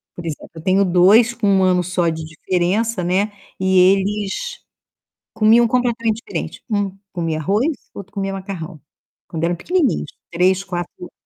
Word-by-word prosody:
por 175 - -8
exemplo, 160 -3 -6
eu 160 - -8
tenho 195 +1 +3
2 200 +7 +5
com 215 -3 -1
1 190 -1 +4
ano 180 -1 +3
só 180 -1 0
de 160 0 -4
diferença, 180 +6 -1
né. 195 +4 +1 0.3
E 190 0 +2
eles 195 +2 +2 1.0
comiam 230 +2 +5
completamente 235 -2 0
diferente. - - -5
1 200 -2 -1
comia 165 -3 -2
arroz, 205 - +1 0.3
o - - -8
outro 195 0 -11
comia 195 -1 -2
macarrão. 185 -5 -6 0.5
Quando 165 -1 -5
eram 175 +1 +1
pequenininhos, 340 - 0 0.2
3, 185 +3 +2
4 175 -2 -5
anos. 180 - -9
190 Hz, 160 wpm, -20 LUFS, 175-210 Hz, 1.0 s, 2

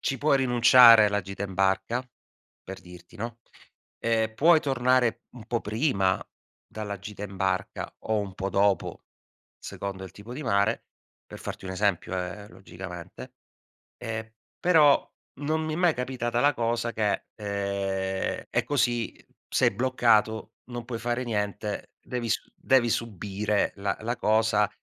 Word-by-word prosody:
ci 135 - -1
puoi 145 0 +3
rinunciare 120 -3 +8
alla 105 0 +1
gita 100 +1 -6
in 95 -2 -7
barca, 95 +6 +1 0.6
per 95 -1 -8
dirti, 90 +3 -14
no, 115 +2 -5 0.6
ehm, 110 -1 0
puoi 160 +6 +5
tornare 125 -3 +2
un 115 -4 -11
po' 120 0 -1
prima 105 -5 +1 0.5
dalla 105 -2 -6
gita 105 +1 -9
in 100 -1 -9
barca 95 -1 -2
o 110 -1 0
un 100 -2 -4
po' 95 +1 -3
dopo, 100 0 +1 0.5
secondo 100 -1 -6
il 95 - -9
tipo 105 +4 -10
di 150 - -5
mare, 110 -3 +1 0.4
per - - -10
farti - - -7
un - - -4
esempio 95 -2 0
eh, 90 +3 -6
logicamente; 90 -1 -10 0.6
ehm, 115 -1 -5 0.3
però 155 -5 +5 0.3
non 155 +2 -1
mi 155 - -2
è - - -2
mai 175 -2 +4
capitata 125 -2 -2
la 145 +1 +4
cosa 115 0 -1
che, 105 -2 0
ehm, 100 -2 -2
è - - +1
così, 120 -5 0 0.3
sei - - +3
bloccato, 110 -2 +2
non 120 -1 -7
puoi 115 -2 -5
fare 120 +2 -1
niente, 105 -2 -3
devi 120 -2 -4
su - - -1
devi 130 -3 +3
subire 105 -1 -1
la 100 0 -2
la 120 +2 -2
cosa 110 -1 +2
110 Hz, 145 wpm, -27 LUFS, 100-120 Hz, 0.6 s, rinunciare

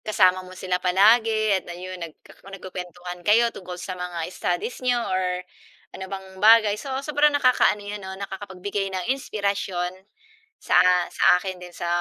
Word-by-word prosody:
kasama 185 -3 +3
mo 185 0 -12
sila 180 0 -2
palagi 215 +2 +3
at - - -19
na 175 - -6
'yon, 185 0 -8
nagka 165 -2 -11
nagkukuwentuhan 180 -2 -8
kayo 225 +5 +3
tungkol 180 -1 -8
sa 180 +1 -6
mga 175 -2 -4
studies 180 +8 -3
n'yo 250 -1 +1
or 185 -5 -1 0.5
ano 190 - -7
bang 190 0 -7
bagay. 215 0 +6
So 280 - -8 0.2
sobrang 295 0 +3
nakakaano 250 -6 +3
'yon 205 0 -6
'no, 190 0 -7
nakakapagbigay 195 0 -5
ng 185 +7 0
inspirasyon 200 -7 -2 0.7
sa - - 0 0.3
sa - - -4 0.2
akin 185 -1 -6
din 180 - -10
sa 175 - -6
190 Hz, 160 wpm, -24 LUFS, 180-215 Hz, 0.7 s, bagay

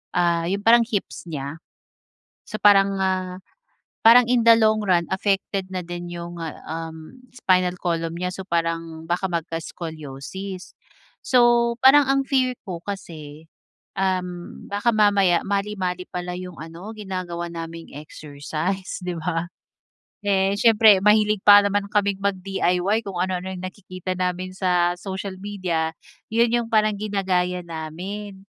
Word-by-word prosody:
ah, 170 -1 +2
yung 200 +2 -2
parang 235 0 +5
hips 200 -5 -4
nya. 145 0 -5 0.9
So, 215 - -4
parang, 195 -1 +5
ah, 185 -1 -1 0.6
parang 235 +2 +8
in 245 0 +2
the 230 0 +7
long 215 -1 +3
run 180 -4 +2
affected 195 -1 -1
na 185 -2 -4
din 175 0 -6
yung, 170 0 -7
ah, 160 -2 -5
um, 160 +8 -7
spinal 180 -6 +1
column 165 -1 -2
nya. 180 +1 -3
So, 190 - -6
parang 165 -2 -3
baka 175 +3 -1
magka-scoliosis. 165 +1 -6 0.5
So, 240 -1 +4
parang 270 +1 +6
ang 275 0 +3
fear 255 -2 +1
ko 175 -3 -6
kasi, 160 -6 -8 0.5
um, 180 -2 -3
baka 205 +4 +1
mamaya 200 -4 +3
mali-mali 195 -3 -2
pala 180 0 -5
yung 180 -2 -8
ano 170 +7 -9
ginagawa 180 -4 -5
naming 165 0 -8
exercise, 155 +6 -5
di 180 -1 -3
ba? 165 +1 -2 0.8
Eh, 195 -1 +2
siyempre 215 -2 +6
mahilig 210 0 +4
pa 205 0 +9
naman 200 0 0
kaming 200 -2 +1
mag-DIY, 195 +1 0
kung 195 -2 -6
ano-ano 185 0 -2
yung 185 -1 -7
nakikita 185 -1 -6
namin 185 0 -2
sa 180 -2 +2
social 190 +1 -6
media, 180 -6 -2 0.4
yun 230 +1 +4
yung 235 -1 0
parang 215 -1 +3
ginagaya 185 -3 -1
namin, 190 +5 -7
185 Hz, 135 wpm, -23 LUFS, 170-205 Hz, 0.9 s, pa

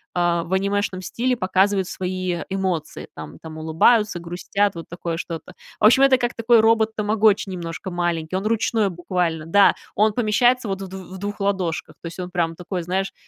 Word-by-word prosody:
а, 175 -1 +1
в 170 - -5
анимешном 195 -1 0
стиле 250 +6 -1
показывают 190 0 +1
свои 185 -1 -3
эмоции, 185 -5 -3
там 80 -1 -9
там, 160 -1 -9
улыбаются, 175 +6 +3
грустят, 180 +4 -1
вот 165 -1 -8
такое 170 -1 -4
что-то. 165 -2 -6 0.3
В - - +3
общем, 235 +5 +6
это 275 -1 +6
как 240 -1 -1
такой 230 0 +4
робот-тамагочи 220 -2 +2
немножко 175 +1 -6
маленький, 175 -1 -2
он 195 +3 -1
ручной 220 -2 +1
буквально, 175 -3 -2
да, 200 +4 +5 0.2
он 215 +1 +3
помещается 240 +2 +2
вот 195 0 -3
в 190 - -5
дв 190 - -9 0.2
в 190 - -7
двух 205 +1 -5
ладошках, 190 -5 -1
то 170 - -6
есть 170 - -9
он 180 -1 -5
прямо 165 -2 -1
такой, 180 +1 -4
знаешь, 190 +3 -2
190 Hz, 180 wpm, -22 LUFS, 175-210 Hz, 0.3 s, общем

